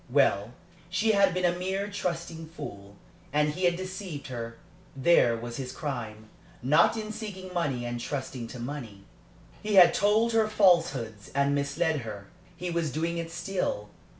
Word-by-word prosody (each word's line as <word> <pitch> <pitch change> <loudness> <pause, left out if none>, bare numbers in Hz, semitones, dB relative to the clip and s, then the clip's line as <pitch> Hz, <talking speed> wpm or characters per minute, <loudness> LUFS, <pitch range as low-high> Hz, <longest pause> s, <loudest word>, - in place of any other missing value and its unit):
Well, 100 +4 +2 0.4
she 215 +5 +2
had 200 -2 +4
been 180 0 0
a 175 0 +3
mere 190 +3 -2
trusting 170 -4 -4
fool, 100 - -9 0.4
and 150 +1 +3
he 180 +5 -1
had 175 -1 +4
deceived 185 -6 -6
her. 115 -2 -5 0.4
There 130 -4 +4
was 120 +1 -6
his 130 -2 -4
crime 115 -7 -5 0.4
not 150 - +4
in 215 -1 -4
seeking 200 -4 -7
money 135 -9 -1
and 120 0 -3
trusting 130 -2 -4
to 125 - -9
money. 120 -6 -6 0.6
He 210 -1 -1
had 175 -3 +9
told 215 +3 +3
her 225 -1 +3
falsehoods 165 - +2
and 140 0 +3
misled 150 +3 +1
her. 105 -5 -7 0.3
He 180 -1 -3
was 170 -3 0
doing 165 +4 -1
it 165 0 -4
still. 175 - -2
160 Hz, 160 wpm, -28 LUFS, 120-185 Hz, 0.6 s, had